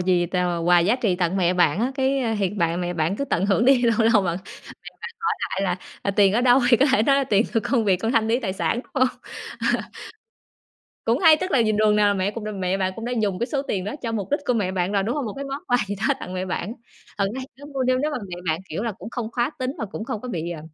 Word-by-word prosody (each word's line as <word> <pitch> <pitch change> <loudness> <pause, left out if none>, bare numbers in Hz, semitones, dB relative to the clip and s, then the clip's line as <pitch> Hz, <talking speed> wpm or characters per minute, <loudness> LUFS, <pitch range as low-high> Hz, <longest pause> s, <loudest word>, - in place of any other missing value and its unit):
gì 180 -1 +2
tèo 180 0 0
là 175 - -1
quà 175 +1 +4
giá 200 +9 +3
trị 215 -8 +1
tặng 180 +1 0
mẹ 180 -1 +2
bạn 175 +1 +2
á, 255 +3 0
cái 265 -4 0
thiệt 195 -1 0
bạn 170 0 0
mẹ 175 0 -2
bạn 165 +4 0
cứ 280 - -2
tận 195 -8 0
hưởng 210 +3 +2
đi, 260 -1 +5
lâu 230 -2 +3 0.2
lâu 210 - +5
bạn 175 -2 -1
mẹ 190 - -9
bạn - - -21 0.9
hỏi - - -4
lại 195 - -2
là, 185 -2 0 0.2
ờ, 200 - -1
"Tiền 195 -1 +4
ở 235 - +2
đâu?" 250 +1 +5
Thì 240 - +6
có 275 - +4
thể 220 -4 +4
nói 275 +2 +4
là 275 - +2
"Tiền 210 -4 +2
của 225 - +3
công 230 +1 +1
việc 195 -2 +4
con 225 +5 -1
thanh 225 -3 +2
lý 235 +3 +2
tài 190 -6 -3
sản," 200 - 0
đúng 370 - -27
hông? 260 -2 +3 0.7
Ờ. - - 0 1.2
Cũng - - +2
hay. 320 -4 +7
Tức 370 +3 -4
là 265 - +3
nhìn 215 -2 +2
đường 215 -1 +3
nào 210 -1 +4
là 205 - +2
mẹ 190 +1 0
cũng 225 0 -7
đ - - -4
mẹ 190 0 -1
bạn 185 0 0
cũng 225 - -6
đã 245 - -3
dùng 195 -3 0
cái 235 - -1
số 275 0 -2
tiền 195 -9 -3
đó 205 - -4
cho 230 -1 -3
mục 200 -4 -3
đích 290 - +1
của 250 - +3
mẹ 200 -5 0
bạn 185 +1 -1
rồi, 200 -1 +2
đúng 230 +5 -1
hông? 285 - -2
Một 210 - -4
cái 280 - -5
món 275 +1 -5
quà 245 - +4
gì 200 - -3
đó - - +3
tặng 180 - -6
mẹ 185 0 -2
bạn. 185 +3 -3 0.5
Thực 200 - +2
ra 265 - -4
thì 260 - -7
cứ 285 - -13
mua, 265 - 0
nếu 255 0 +2
nếu 295 +3 0
mà 295 - -3
mẹ 175 - -5
bạn, 160 +2 0
kiểu 170 +6 -4
là, 230 -2 -2
cũng 215 - -10
không 235 -2 -4
khá 240 +4 0
tính 255 0 -1
và - - -2
cũng 215 +2 -6
không 225 - -4
có 250 - -7
bị, 170 -5 -3
ờ, 165 - -6
210 Hz, 315 wpm, -23 LUFS, 185-250 Hz, 1.2 s, hay